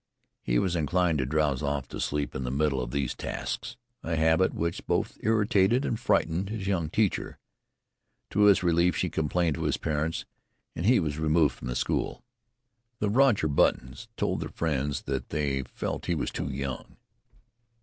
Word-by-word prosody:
He - - 0
was 90 +5 +1
inclined 85 0 +1
to 65 - 0
drowse 75 -2 +1
off 70 -2 -2
to - - -6
sleep 75 0 -1
in 65 - -3
the 60 - -2
middle 70 0 +1
of - - -4
these 70 0 -1
tasks, 120 - -5 0.2
a 85 0 -2
habit 80 +3 +3
which 85 +1 -3
both - - 0
irritated 110 +2 +3
and 115 - -1
frightened 95 -5 +1
his 105 -3 -4
young 90 -6 0
teacher. 105 +2 0 0.9
To 105 +1 +4
his 100 -3 +5
relief 85 0 +3
she - - -1
complained 80 0 0
to - - -3
his - - +1
parents, 80 +1 -2 0.5
and 85 - -2
he 125 - +6
was 75 -4 -2
removed 80 -1 +3
from - - -9
the 60 - -3
school. - - -1 0.7
The 105 -2 0
Roger 120 - +4
Buttons 65 -2 +1
told - - 0
their - - -4
friends 75 -3 -1
that 65 -2 -3
they 70 -3 0
felt 65 - -5
he 85 - +1
was 75 - -2
too - - -3
young. 70 -1 -5
80 Hz, 175 wpm, -28 LUFS, 70-95 Hz, 0.9 s, he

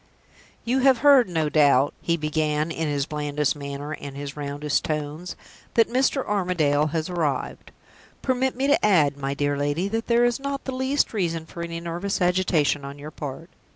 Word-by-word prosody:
"You 250 +3 +1
have 265 -1 +5
heard, 270 -7 +7
no 160 -3 0
doubt," 145 -2 +4
he 170 0 0
began, 155 0 -1
in 160 0 -2
his 145 -2 0
blandest 150 -1 -1
manner 140 +1 -6
and 140 -2 -7
his 140 -1 -6
roundest 145 0 -2
tones, 155 +3 -4 0.4
"that 230 - +5
Mr. 260 +2 +1
Armadale 175 -7 +1
has 160 0 -2
arrived. 160 -7 -2 0.5
Permit 260 0 0
me 265 +2 -1
to 285 +1 +3
add, 160 -9 +4
my 140 0 -3
dear 145 0 0
lady, 145 +6 -1
that 225 +2 -2
there 235 0 +4
is 240 +2 +1
not 275 0 -4
the 265 - -3
least 260 +2 0
reason 165 -6 -1
for 170 - -9
any 170 0 -4
nervous 170 +4 -3
agitation 180 -5 +2
on 140 +1 -7
your 150 +2 -9
part. 150 +4 -7
160 Hz, 180 wpm, -24 LUFS, 145-210 Hz, 0.5 s, heard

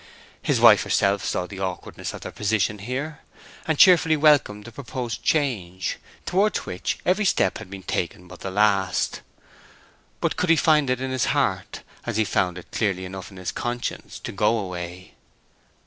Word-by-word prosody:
His - - +1
wife - - +8
herself 100 0 +1
saw 90 - -1
the 95 +1 -9
awkwardness 95 -2 -4
of - - -9
their - - -6
position 105 0 0
here, 135 +8 -4 0.5
and 160 -2 +1
cheerfully 165 -3 +6
welcomed 145 -9 +4
the 120 - -9
purposed 120 -2 -5
change, 100 - -1 0.3
towards 200 +4 +1
which 90 - -3
every 190 +4 +2
step 200 - +2
had 110 -4 -10
been 95 -1 -8
taken 90 +1 -3
but 90 0 -12
the 95 - -5
last. 100 -2 +1 1.0
But - - -1
could 180 - 0
he 165 - +7
find 150 -4 +3
it 130 0 0
in 130 0 -2
his 130 -1 +1
heart—as 120 -3 -2
he 110 - +4
found 90 -3 0
it 90 - -11
clearly 100 -3 -1
enough 95 0 -7
in 95 - -14
his 90 -1 -4
conscience—to 120 0 -4
go 105 +4 +2
away? 90 -2 -6
105 Hz, 165 wpm, -24 LUFS, 95-135 Hz, 1.0 s, wife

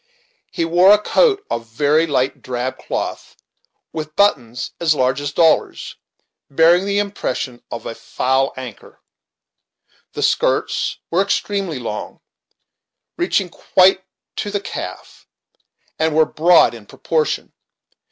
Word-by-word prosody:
He 165 - -1
wore 175 +4 +5
a - - +6
coat 405 - +2
of 115 0 -3
very 145 +7 +2
light 135 -3 -1
drab 125 +1 -4
cloth, - - -5 0.6
with 155 -1 -6
buttons 125 - +1
as 160 -3 +2
large 130 +1 +1
as 145 0 -3
dollars, 160 +2 +1 0.5
bearing 170 +6 +4
the 200 0 0
impression 195 -11 -3
of 115 - -7
a - - -4
"foul 130 +3 0
anchor." 125 -5 -10 1.1
The - - -3
skirts - - 0
were 175 +3 +3
extremely 195 -4 -1
long, 115 -4 -6 1.0
reaching 205 - 0
quite 185 +2 +3 0.3
to 205 - -3
the 205 0 -1
calf, - - -8 0.7
and 160 -1 +1
were 160 0 +5
broad 170 0 +4
in 110 -3 -12
proportion. 155 -2 -2
160 Hz, 125 wpm, -19 LUFS, 130-190 Hz, 1.1 s, a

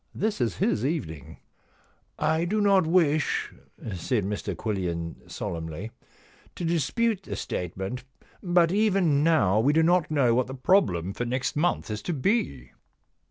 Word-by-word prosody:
This 210 -8 -1
is 115 -8 0
his 110 - +1
evening.' 80 - -4 0.4
* - - -36 0.2
I 160 +1 +1
do 210 +5 0
not 195 -4 +4
wish,' 160 -3 +1 0.4
said 100 +4 -1
Mr 100 -1 -3
Quillian 85 -5 -4
solemnly, 80 +6 -5 0.3
* - - -29
to 175 - -4
dispute 185 - 0
the - - -6
statement, 95 +7 -4 0.4
but 175 -2 +3
even 190 -8 +2
now 110 - +3
we 135 +6 +3
do 160 +1 +4
not 175 -1 +3
know 135 -6 +3
what 125 +1 +1
the 130 - -6
problem 125 - +2
for 120 - -3
next 125 +2 -2
month 160 -6 0
is 105 - -4
to 175 - -3
be.' 130 - -1
135 Hz, 155 wpm, -26 LUFS, -, 0.4 s, not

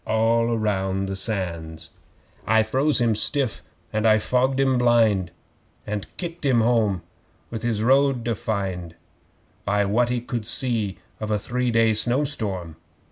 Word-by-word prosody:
(All 115 +1 +2
round 95 -2 -1
the 95 - -3
Sands!) 85 -6 -4 0.6
'I 110 +1 +4
froze 135 +7 +1
him 120 -2 +2
stiff 130 +2 0 0.3
and 110 +1 +1
I 110 0 +6
fogged 130 +4 +1
him 135 -2 +2
blind, 115 -7 +3 0.6
And 105 -1 -4
kicked 170 -2 -6
him 130 -5 +3
home 110 -6 +1 0.5
with 115 -2 -4
his 110 -3 -1
road 135 -1 +3
to 120 - 0
find 95 -6 -4 0.7
By 105 0 +1
what 120 +5 +1
he 125 0 0
could 120 -2 -4
see 110 -7 0 0.2
of 110 - -4
a 105 - +1
three 125 +4 -2
day 115 -1 +3
snow 120 +6 +2
storm. 95 - -3
110 Hz, 150 wpm, -23 LUFS, 100-125 Hz, 0.7 s, I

